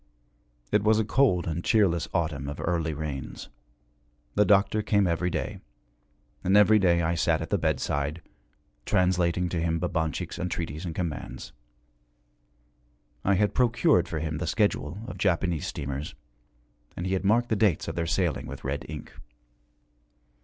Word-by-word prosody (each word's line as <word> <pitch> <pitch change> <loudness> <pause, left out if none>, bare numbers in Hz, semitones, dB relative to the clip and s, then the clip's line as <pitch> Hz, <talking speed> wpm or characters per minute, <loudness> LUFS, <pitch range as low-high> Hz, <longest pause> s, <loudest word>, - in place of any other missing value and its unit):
It 105 - +3
was 110 0 +4
a 110 - +1
cold 110 -8 +2
and 85 +1 -3
cheerless 95 -8 +2
autumn 75 -6 -1
of 70 - -6
early 80 -2 -1
rains. 70 -3 -6 0.8
The 105 - +3
doctor 100 +1 +3
came 100 -1 +2
every 90 +1 0
day. - - -3 0.8
And 95 +3 +4
every 105 +1 +6
day 85 -3 +3
I 80 +1 +1
sat 85 - +1
at - - -6
the - - +2
bedside, 70 +3 -1 0.6
translating 90 +1 +1
to 85 -1 -2
him 85 0 0
Babanchik's 80 -3 -2
entreaties 85 -2 -3
and 85 -2 -5
commands. 85 -5 -5 1.7
I 100 - +3
had 105 +2 +2
procured 120 - +3
for 80 - -4
him 80 0 -3
the 90 - -3
schedule 95 -5 0
of - - -8
Japanese 85 -3 0
steamers, 70 0 -5 0.8
and 85 - -3
he 95 - -1
had 95 - 0
marked 115 +4 +2
the 110 - +2
dates 100 -5 +2
of - - -3
their 85 -1 -2
sailing 85 -1 0
with - - -8
red 70 +1 -3
ink. 75 -1 -8
85 Hz, 155 wpm, -27 LUFS, 80-100 Hz, 1.7 s, every